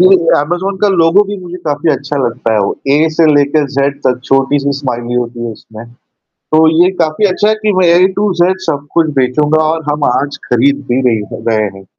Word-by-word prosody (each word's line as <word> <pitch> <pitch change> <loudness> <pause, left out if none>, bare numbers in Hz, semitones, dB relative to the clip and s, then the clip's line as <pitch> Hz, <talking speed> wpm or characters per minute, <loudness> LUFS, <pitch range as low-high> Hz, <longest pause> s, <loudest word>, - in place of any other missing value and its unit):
जी, 185 - +6
जी, 185 -3 +3
Amazon 175 +6 -2
का 205 - +3
लोगो 175 +1 +3
भी 205 - -4
मुझे 180 -2 -9
काफ़ी 150 +1 0
अच्छा 140 +2 -4
लगता 115 -1 -2
है। - - +2
वो 100 - -1 0.2
ए 150 +3 +3
से 165 +1 +2
लेके 145 +1 +2
ज़ेड 140 +1 0
तक 125 -1 0
छोटी-सी 140 +1 +1
स्माइली 120 -3 -4
होती 120 -1 -3
है - - -4
उसमें। 110 +1 -12 0.7
तो 160 +1 +5 0.2
ये 185 - +2
काफ़ी 160 +6 0
अच्छा 205 +3 0
है 215 - +3
कि 210 -1 +1
वह 185 -1 +3
ए 185 - +5
टू 205 -1 +1
जेड 185 +2 +2
सब 145 -3 -3
कुछ 165 -2 +2
बेचूँगा 150 +5 +1
और 160 +1 -1
हम 150 0 -2
आज 145 +2 -2
खरीद 140 +4 +1
भी 125 +2 +1
रे 120 - +2 0.2
हैं - - -8
रहे 110 -1 +1
हैं। 95 - -14
145 Hz, 220 wpm, -13 LUFS, 130-175 Hz, 0.7 s, जी